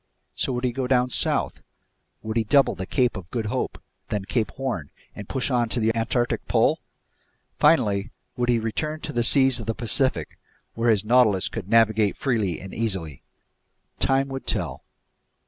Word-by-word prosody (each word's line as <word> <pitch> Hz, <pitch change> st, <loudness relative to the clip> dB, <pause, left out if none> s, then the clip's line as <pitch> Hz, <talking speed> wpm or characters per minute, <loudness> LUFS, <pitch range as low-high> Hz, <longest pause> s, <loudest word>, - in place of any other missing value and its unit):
So -, -, -1 dB
would 125 Hz, 0 st, -3 dB
he 125 Hz, -, +1 dB
go 130 Hz, +1 st, -3 dB
down 125 Hz, -1 st, +2 dB
south? -, -, +1 dB, 0.6 s
Would 110 Hz, 0 st, -4 dB
he 115 Hz, -, +2 dB
double 135 Hz, +6 st, +3 dB
the 95 Hz, 0 st, -6 dB
Cape 125 Hz, +3 st, +1 dB
of 90 Hz, -3 st, -8 dB
Good 115 Hz, -1 st, -3 dB
Hope, 105 Hz, -, -3 dB, 0.3 s
then 105 Hz, -2 st, -2 dB
Cape 110 Hz, +1 st, -1 dB
Horn, 120 Hz, -, -4 dB, 0.3 s
and 105 Hz, -, -9 dB
push 135 Hz, 0 st, -1 dB
on 120 Hz, -2 st, +1 dB
to 120 Hz, -, 0 dB
the 110 Hz, 0 st, +1 dB
Antarctic 120 Hz, +1 st, -1 dB
pole? -, -, +2 dB, 0.8 s
Finally, 100 Hz, +1 st, +3 dB, 0.3 s
would 120 Hz, 0 st, -1 dB
he 120 Hz, -, +4 dB
return 150 Hz, +8 st, -3 dB
to -, -, -6 dB
the 120 Hz, -, +1 dB
seas 130 Hz, +2 st, +4 dB
of -, -, -7 dB
the 115 Hz, -, -1 dB
Pacific, 120 Hz, -, -1 dB, 0.3 s
where 115 Hz, +1 st, 0 dB
his 105 Hz, -2 st, +2 dB
Nautilus 110 Hz, -5 st, +3 dB
could 100 Hz, -4 st, -6 dB
navigate 110 Hz, -2 st, +3 dB
freely 110 Hz, -, -1 dB
and 95 Hz, 0 st, -10 dB
easily? 95 Hz, -, -3 dB, 0.8 s
Time 135 Hz, 0 st, +2 dB
would 135 Hz, 0 st, -6 dB
tell. -, -, -2 dB
115 Hz, 175 wpm, -24 LUFS, 105-125 Hz, 0.8 s, he